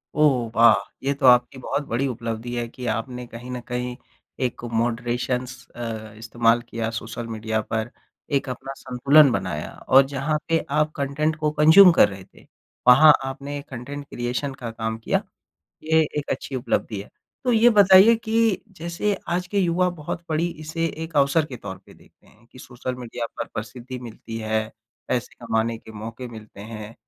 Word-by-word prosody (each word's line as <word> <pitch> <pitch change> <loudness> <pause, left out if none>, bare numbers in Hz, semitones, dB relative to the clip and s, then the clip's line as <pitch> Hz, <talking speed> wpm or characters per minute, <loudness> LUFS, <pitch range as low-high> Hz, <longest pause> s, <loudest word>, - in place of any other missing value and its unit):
ओह 135 -6 +3
वाह! 115 0 +7 0.3
ये 140 +1 +1
तो 140 -1 -2
आपकी 125 +1 +5
बहुत 145 +3 -2
बड़ी 130 +4 0
उपलब्धि 115 0 -4
है 120 -1 -2
कि 125 +1 -9
आपने 125 +2 -3
कहीं 120 +2 -9
न 125 - -4
कहीं 125 0 -3 0.5
एक 120 - -4
मॉडरेशन्स 120 +2 -2
अ, 110 -3 -6
इस्तेमाल 115 +1 +2
किया 115 -1 -2
सोशल 115 +1 -6
मीडिया 110 0 -2
पर। 110 +2 -3 0.4
एक 135 - 0
अपना 130 +2 -6
संतुलन 140 +3 +5
बनाया 85 -9 -3 0.2
और 135 +1 +7
जहाँ 145 +3 0
पे 165 0 +3 0.2
आप 150 0 +2
कंटेंट 150 +2 -1
को 150 -1 +1
कंज़्यूम 160 +5 +8
कर 135 - +6
रहे 95 -1 -9
थे, - - -21 0.4
वहाँ 150 +5 +9
आपने 140 +2 -5
कंटेंट 140 +3 -7
क्रिएशन 125 +3 -3
का 120 -4 -6
काम 110 0 -3
किया, - - 0 0.6
ये 160 +1 +3 0.2
एक 145 - -4
अच्छी 135 - -4
उपलब्धि 110 -4 -2
है। 100 - -10 0.4
तो 250 - +2
ये 230 +2 +6
बताइए 200 +1 +7
कि 225 -2 +1 0.2
जैसे 170 +5 -1
आज 180 +1 -1
के 200 +2 -2
युवा 180 -1 +2
बहुत 165 0 -6
बड़ी 160 +2 +1
इसे 165 +2 -2 0.2
एक 160 -1 -8
अवसर 140 +3 +3
के 125 - -8
तौर 100 -4 -8
पे - - -16
देखते - - -24
हैं 110 +2 -24
कि 130 - -17
सोशल 125 0 -6
मीडिया 120 -1 -5
पर 115 - -2
प्रसिद्धि 120 +4 -6
मिलती 115 -1 -8
है, 110 0 -1 0.4
पैसे 125 -1 -2
कमाने 115 0 0
के 110 - -14
मौके 115 +4 -7
मिलते 110 -3 -12
हैं 110 0 -8
125 Hz, 175 wpm, -23 LUFS, 115-150 Hz, 0.6 s, वहाँ